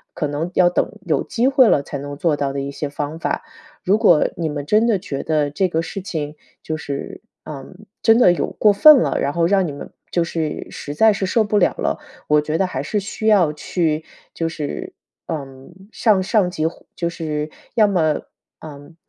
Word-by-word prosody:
可 155 Hz, -, -1 dB
能 145 Hz, +4 st, -3 dB
要 180 Hz, -, +5 dB
等 -, -, 0 dB
有 160 Hz, -, +1 dB
机 245 Hz, +3 st, 0 dB
会 270 Hz, -3 st, +5 dB
了， 140 Hz, -, +3 dB
才 140 Hz, -, -6 dB
能 145 Hz, 0 st, -7 dB
做 155 Hz, -1 st, +1 dB
到 140 Hz, -1 st, -2 dB
的 140 Hz, -, -3 dB
一 140 Hz, +1 st, -4 dB
些 145 Hz, +1 st, -4 dB
方 145 Hz, +2 st, -5 dB
法。 -, -, -2 dB, 0.4 s
如 200 Hz, +4 st, +3 dB
果 150 Hz, -, +4 dB
你 160 Hz, -2 st, -2 dB
们 145 Hz, -1 st, -4 dB
真 215 Hz, +8 st, +3 dB
的 215 Hz, -4 st, +3 dB
觉 145 Hz, -7 st, -5 dB
得 150 Hz, -2 st, 0 dB
这 185 Hz, +6 st, +1 dB
个 165 Hz, -2 st, -1 dB
事 195 Hz, -, -6 dB
情， 155 Hz, -6 st, -4 dB, 0.3 s
就 155 Hz, -, -3 dB
是， 145 Hz, -3 st, -6 dB, 0.2 s
嗯， 155 Hz, +8 st, -10 dB, 0.2 s
真 225 Hz, 0 st, +5 dB
的 180 Hz, -8 st, +6 dB
有 -, -, -1 dB
过 210 Hz, -1 st, +3 dB
分 300 Hz, +8 st, +8 dB
了， -, -, +1 dB
然 140 Hz, -, 0 dB
后 170 Hz, -1 st, +2 dB
让 190 Hz, 0 st, +2 dB
你 150 Hz, -, -4 dB
们 140 Hz, -, -9 dB, 0.2 s
就 170 Hz, -, +2 dB
是 165 Hz, -2 st, -3 dB
实 145 Hz, 0 st, -7 dB
在 220 Hz, +3 st, +5 dB
是 195 Hz, -1 st, -2 dB
受 225 Hz, +4 st, +2 dB
不 210 Hz, 0 st, +1 dB
了 -, -, +4 dB
了， -, -, -1 dB, 0.3 s
我 150 Hz, 0 st, +4 dB
觉 155 Hz, +2 st, -2 dB
得 190 Hz, -, +2 dB
还 135 Hz, -8 st, -3 dB
是 205 Hz, +9 st, -1 dB
需 215 Hz, +2 st, -4 dB
要 185 Hz, -8 st, +4 dB
去， 155 Hz, 0 st, -1 dB, 0.3 s
就 165 Hz, -1 st, -2 dB
是， 150 Hz, -3 st, -5 dB, 0.3 s
嗯， 135 Hz, 0 st, -7 dB, 0.2 s
向 210 Hz, -5 st, +2 dB
上 195 Hz, -2 st, +2 dB
级 155 Hz, -3 st, -4 dB, 0.3 s
就 170 Hz, -1 st, -2 dB
是， 155 Hz, -2 st, -4 dB, 0.2 s
要 220 Hz, -2 st, +5 dB
么， 160 Hz, -6 st, +1 dB, 0.4 s
嗯， 150 Hz, +2 st, -12 dB
165 Hz, 225 characters per minute, -20 LUFS, 150-195 Hz, 0.4 s, 分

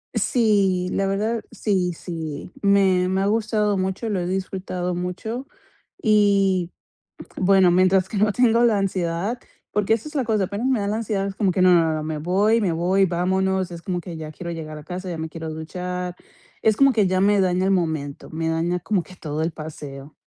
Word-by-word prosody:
Sí, 195 Hz, -6 st, +2 dB
la 195 Hz, -, 0 dB
verdad 215 Hz, +4 st, -1 dB
sí, 185 Hz, -4 st, 0 dB
sí. 160 Hz, -2 st, -6 dB
Me 190 Hz, -2 st, +4 dB
me 190 Hz, +1 st, +1 dB
ha -, -, +1 dB
gustado 210 Hz, -2 st, +1 dB
mucho, 190 Hz, +4 st, -2 dB
lo 195 Hz, -3 st, 0 dB
he 175 Hz, -, -2 dB
disfrutado 185 Hz, -1 st, -3 dB
mucho. 220 Hz, +9 st, -4 dB, 0.5 s
Y, 200 Hz, -4 st, +3 dB, 0.7 s
bueno, 190 Hz, -1 st, +4 dB
mientras 185 Hz, +1 st, +3 dB
que 210 Hz, -, -6 dB
no 210 Hz, +1 st, +3 dB
tengo 235 Hz, 0 st, +3 dB
la 225 Hz, -4 st, +4 dB
ansiedad, 190 Hz, +4 st, -1 dB, 0.3 s
porque, 210 Hz, +1 st, +1 dB
esa 230 Hz, +7 st, -4 dB
es 300 Hz, -, -13 dB
la 270 Hz, -4 st, 0 dB
cosa, 215 Hz, -4 st, +1 dB
apenas 205 Hz, +7 st, -3 dB
me 260 Hz, -4 st, +2 dB
da 200 Hz, -, -1 dB
la 210 Hz, +2 st, -1 dB
ansiedad, 205 Hz, -3 st, -1 dB
es 195 Hz, -, -4 dB
como 195 Hz, -2 st, +1 dB
que 185 Hz, +1 st, +1 dB
no 180 Hz, -1 st, +6 dB
no 165 Hz, -2 st, +3 dB
no 155 Hz, -, -2 dB
me 155 Hz, -1 st, -3 dB
voy 200 Hz, +8 st, +2 dB
me 190 Hz, -5 st, +1 dB
voy, 185 Hz, +4 st, +2 dB
vámonos, 190 Hz, +1 st, 0 dB
es 170 Hz, 0 st, -8 dB
como 180 Hz, 0 st, -2 dB
que 170 Hz, -2 st, -8 dB
ya 155 Hz, -1 st, -7 dB
quiero 170 Hz, +2 st, -7 dB
llegar 155 Hz, -2 st, -6 dB
a 150 Hz, -, -12 dB
casa, 185 Hz, 0 st, -6 dB
ya 165 Hz, -, -4 dB
me 160 Hz, 0 st, -4 dB
quiero 160 Hz, 0 st, -6 dB
duchar, 180 Hz, +3 st, -5 dB, 0.5 s
es 220 Hz, -1 st, +3 dB
como 275 Hz, -1 st, +5 dB
que 210 Hz, -5 st, +3 dB
ya 185 Hz, 0 st, +1 dB
me 205 Hz, 0 st, +4 dB
daña 185 Hz, 0 st, +1 dB
el 195 Hz, -, +2 dB
momento, 160 Hz, -6 st, -2 dB
me 160 Hz, 0 st, -2 dB
daña 170 Hz, +2 st, 0 dB
como 190 Hz, 0 st, 0 dB
que 185 Hz, +1 st, -15 dB
todo, 155 Hz, -1 st, -4 dB
el 165 Hz, -, 0 dB
paseo. 145 Hz, -2 st, -9 dB
185 Hz, 205 wpm, -23 LUFS, 170-205 Hz, 0.7 s, no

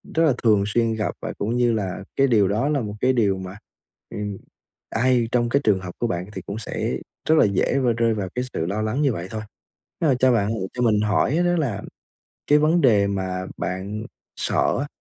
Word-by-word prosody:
rất 165 Hz, -, +4 dB
là 155 Hz, -4 st, +4 dB
thường 105 Hz, -3 st, +4 dB
xuyên 115 Hz, +2 st, +1 dB
gặp 110 Hz, -1 st, -1 dB
và -, -, -4 dB
cũng 110 Hz, +4 st, -1 dB
như 120 Hz, -1 st, +3 dB
là 95 Hz, -3 st, -3 dB
cái 135 Hz, -, +4 dB
điều 110 Hz, -6 st, +4 dB
đó 110 Hz, +9 st, 0 dB
là 145 Hz, -3 st, +1 dB
một 105 Hz, -2 st, -4 dB
cái 130 Hz, +1 st, +3 dB
điều 100 Hz, -6 st, +2 dB
mà, 95 Hz, +1 st, -7 dB, 0.5 s
ừm, 105 Hz, -1 st, -4 dB, 0.5 s
ai 120 Hz, 0 st, +2 dB
trong 120 Hz, -1 st, +1 dB
cái 140 Hz, +3 st, +2 dB
trường 105 Hz, -6 st, +3 dB
hợp 90 Hz, -1 st, -7 dB
của 120 Hz, -, 0 dB
bạn 90 Hz, -3 st, -2 dB
thì -, -, -5 dB
cũng 100 Hz, -, -6 dB
sẽ 110 Hz, -, -3 dB, 0.4 s
rất 160 Hz, -, +6 dB
là -, -, +6 dB
dễ 100 Hz, +6 st, +1 dB
và 125 Hz, -3 st, +2 dB
rơi 115 Hz, -1 st, +2 dB
vào 100 Hz, -4 st, -3 dB
cái 125 Hz, +1 st, -1 dB
sự 80 Hz, -, -1 dB
lo 100 Hz, +5 st, -2 dB
lắng 110 Hz, +6 st, -1 dB
như 140 Hz, -4 st, +2 dB
vậy 90 Hz, -2 st, -5 dB
thôi. 110 Hz, +1 st, -5 dB, 0.6 s
Nếu 160 Hz, -, +3 dB
mà 130 Hz, -, +3 dB
cho 130 Hz, 0 st, +4 dB
bạn 105 Hz, -4 st, +2 dB
lựa 95 Hz, -4 st, -3 dB
cho 125 Hz, -, -2 dB
mình 110 Hz, -3 st, +3 dB
hỏi 105 Hz, +7 st, +1 dB
á 175 Hz, -, +3 dB
đó 175 Hz, 0 st, +2 dB
là 120 Hz, -11 st, -1 dB, 0.7 s
cái 150 Hz, -, +6 dB
vấn 160 Hz, +3 st, +3 dB
đề 105 Hz, -7 st, +4 dB
mà 95 Hz, -2 st, -2 dB
bạn 100 Hz, +4 st, -4 dB, 0.3 s
sợ -, -, +1 dB
á, 145 Hz, -, -2 dB
110 Hz, 235 wpm, -23 LUFS, 100-130 Hz, 0.7 s, rất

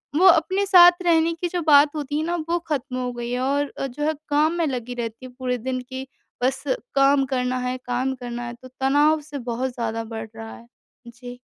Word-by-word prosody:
वो 365 Hz, +5 st, +6 dB
अपने 375 Hz, +3 st, +4 dB
साथ 355 Hz, -2 st, +7 dB
रहने 330 Hz, -1 st, +3 dB
की 355 Hz, -, 0 dB
जो 355 Hz, 0 st, -2 dB
बात 290 Hz, 0 st, +6 dB
होती 295 Hz, -1 st, -3 dB
हैं 310 Hz, -, -1 dB
ना 345 Hz, +1 st, -1 dB
वो 345 Hz, +1 st, +1 dB
खत्म 270 Hz, -3 st, -2 dB
हो 250 Hz, -1 st, -2 dB
गई 240 Hz, 0 st, -5 dB
हैं। 250 Hz, -, -1 dB
और 280 Hz, +2 st, 0 dB
अ, 275 Hz, -, -1 dB
जो 270 Hz, +3 st, -6 dB
है 310 Hz, +1 st, +1 dB, 0.2 s
काम 300 Hz, +3 st, +2 dB
में 335 Hz, -, +1 dB
लगी 250 Hz, -3 st, -4 dB
रहती 230 Hz, +1 st, -5 dB
हैं 255 Hz, -, -11 dB
पूरे 250 Hz, -1 st, -1 dB
दिन 255 Hz, +2 st, -3 dB
कि 260 Hz, 0 st, -6 dB, 0.4 s
बस 265 Hz, +1 st, 0 dB, 0.3 s
काम 275 Hz, 0 st, +4 dB
करना 250 Hz, 0 st, 0 dB
हैं, 250 Hz, 0 st, -2 dB
काम 255 Hz, +2 st, -1 dB
करना 245 Hz, -1 st, -6 dB
है, 235 Hz, -, -6 dB
तो 245 Hz, +2 st, -13 dB
तनाव 290 Hz, +4 st, +3 dB
से 285 Hz, -, -4 dB
बहुत 255 Hz, +3 st, -2 dB
ज़्यादा 230 Hz, -2 st, -3 dB
बढ़ 220 Hz, 0 st, -6 dB
रहा 225 Hz, 0 st, -8 dB
है। 235 Hz, -, -16 dB, 0.4 s
जी। 245 Hz, +1 st, -10 dB
265 Hz, 225 wpm, -23 LUFS, 245-305 Hz, 0.4 s, साथ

